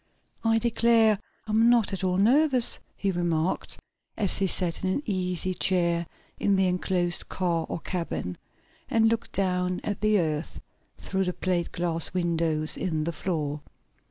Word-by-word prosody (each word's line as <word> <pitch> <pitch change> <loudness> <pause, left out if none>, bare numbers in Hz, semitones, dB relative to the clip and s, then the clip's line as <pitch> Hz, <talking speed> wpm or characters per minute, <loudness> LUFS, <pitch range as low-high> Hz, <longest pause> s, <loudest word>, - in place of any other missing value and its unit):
"I 225 0 +3
declare 225 -2 +3 0.3
I'm 220 +2 +3
not 235 -4 +3
at 195 - -4
all 180 -1 +1
nervous," 255 +4 +4 0.2
he 195 - 0
remarked, 175 -1 -1 0.4
as 200 -4 +2
he 195 - +2
sat 180 -1 +1
in 190 - 0
an 235 +10 -1
easy 185 -3 -1
chair 170 -2 +1 0.3
in 200 - +2
the 190 0 +2
enclosed 180 -1 +1
car 170 -3 -1
or - - -3
cabin, 165 - -4 0.5
and 225 0 +3
looked 230 0 -2
down 180 -1 0
at 205 - -4
the 215 0 +3
earth 155 -3 -2 0.4
through 190 0 -2
the 180 - -2
plate 175 -2 -1
glass 170 0 -1
windows 165 -3 +1
in 160 -4 -1
the 170 +2 -3
floor. 150 -3 -3
185 Hz, 155 wpm, -26 LUFS, 170-210 Hz, 0.5 s, nervous